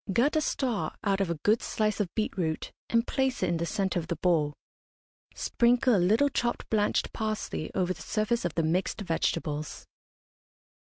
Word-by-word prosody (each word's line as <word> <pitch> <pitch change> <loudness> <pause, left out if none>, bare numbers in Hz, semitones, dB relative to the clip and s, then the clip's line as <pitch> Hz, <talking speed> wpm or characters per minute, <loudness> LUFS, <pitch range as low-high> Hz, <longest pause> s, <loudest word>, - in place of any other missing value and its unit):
Gut 250 - +2
a 310 - +3
star 250 -7 -1
out 200 -1 +1
of 190 - 0
a 170 - 0
good 210 +9 +2
slice 215 0 -1
of 200 -4 -1
beet 215 -1 -1
root, 160 -4 -2 0.2
and 230 0 +3
place 265 -6 0
it 185 - +2
in 170 - +1
the 170 +1 -2
centre 190 -1 0
of 165 - -6
the 170 - -1
bowl; 155 -3 +1 0.8
sprinkle 245 0 +3
a 190 - +3
little 225 +10 +4
chopped 240 -3 -1
blanched 210 -2 +1
parsley 215 -7 -3
over 185 -1 +1
the 160 - -13
surface 225 +2 0
of 175 -3 -2
the 165 - +1
mixed 180 +6 0
vegetables. 160 -4 -2
200 Hz, 180 wpm, -28 LUFS, 170-230 Hz, 0.8 s, little